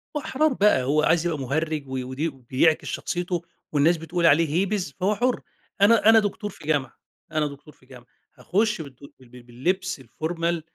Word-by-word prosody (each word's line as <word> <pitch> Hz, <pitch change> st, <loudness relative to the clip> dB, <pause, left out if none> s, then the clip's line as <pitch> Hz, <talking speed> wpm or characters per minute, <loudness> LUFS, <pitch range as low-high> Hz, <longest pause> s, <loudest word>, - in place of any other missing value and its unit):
وأحرار 295 Hz, 0 st, +1 dB
بقى 205 Hz, -, +3 dB
هو 150 Hz, +4 st, +2 dB
عايز 165 Hz, +1 st, +3 dB
يبقى 160 Hz, -4 st, -1 dB
مهرج 155 Hz, +3 st, -2 dB
و 130 Hz, -1 st, -3 dB
وده 135 Hz, 0 st, -4 dB
بيعكس 155 Hz, +5 st, +2 dB
شخصيته، 175 Hz, -1 st, -3 dB, 0.3 s
والناس 155 Hz, +3 st, +3 dB
بتقول 165 Hz, +2 st, -2 dB
عليه 165 Hz, +1 st, +5 dB
هيبيز 185 Hz, -2 st, -1 dB
فهو 200 Hz, +3 st, +1 dB
حُرّ. 250 Hz, +2 st, 0 dB, 0.4 s
أنا 220 Hz, +1 st, +6 dB
أنا 225 Hz, 0 st, +8 dB
دكتور 205 Hz, 0 st, -3 dB
في 155 Hz, -6 st, -13 dB
جامعة، 140 Hz, -5 st, -1 dB, 0.3 s
أنا 155 Hz, -1 st, +1 dB
دكتور 145 Hz, +1 st, -12 dB
في 130 Hz, -, -26 dB
جامعة 125 Hz, -2 st, -15 dB, 0.3 s
هاخُش 210 Hz, -1 st, 0 dB
بالدُ 135 Hz, -4 st, -11 dB, 0.2 s
بال 125 Hz, -2 st, -18 dB
بال 125 Hz, 0 st, -14 dB
باللبس 175 Hz, +7 st, -2 dB
الformal 165 Hz, +6 st, -3 dB
160 Hz, 175 wpm, -24 LUFS, 140-185 Hz, 0.4 s, أنا